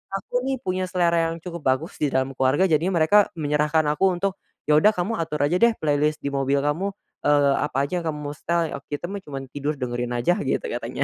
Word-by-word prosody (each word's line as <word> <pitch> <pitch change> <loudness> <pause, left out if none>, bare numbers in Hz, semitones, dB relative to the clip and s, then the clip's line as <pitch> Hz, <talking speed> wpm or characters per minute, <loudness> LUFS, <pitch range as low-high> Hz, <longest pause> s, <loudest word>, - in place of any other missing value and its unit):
aku 195 - -7
nih, 270 - +1
punya 185 0 -1
selera 170 -2 +2
yang 165 - -5
cukup 170 -2 -6
bagus 135 +7 -1
di 150 - +2
dalam 130 0 0
keluarga, 135 +6 +2
jadinya 170 +4 +2
mereka 205 +4 +5
menyerahkan 150 +1 +1
aku 170 +6 +1
untuk, 195 +2 -2 0.2
"Ya, 150 0 +4
udah, 210 +6 +5
kamu 180 +2 -2
atur 150 -3 -1
aja 155 +5 +2
deh 235 0 +5
playlist 150 0 0
di 140 - -2
mobil 140 0 +1
kamu, 185 +7 -1 0.3
eee, 145 -1 +4
apa 145 -3 -2
aja 175 +5 -1
yang 170 - -7
kamu 150 -1 -3
mau - - -9
setel, 170 -1 -1
eee, - - -6
kita 160 +6 -5
mah 200 - -4
cuma 135 -2 -6
tidur 145 +3 -4
dengerin 120 -2 -3
aja," 175 - +1
gitu - - -1
katanya. - - -3
150 Hz, 225 wpm, -24 LUFS, 140-180 Hz, 0.3 s, mereka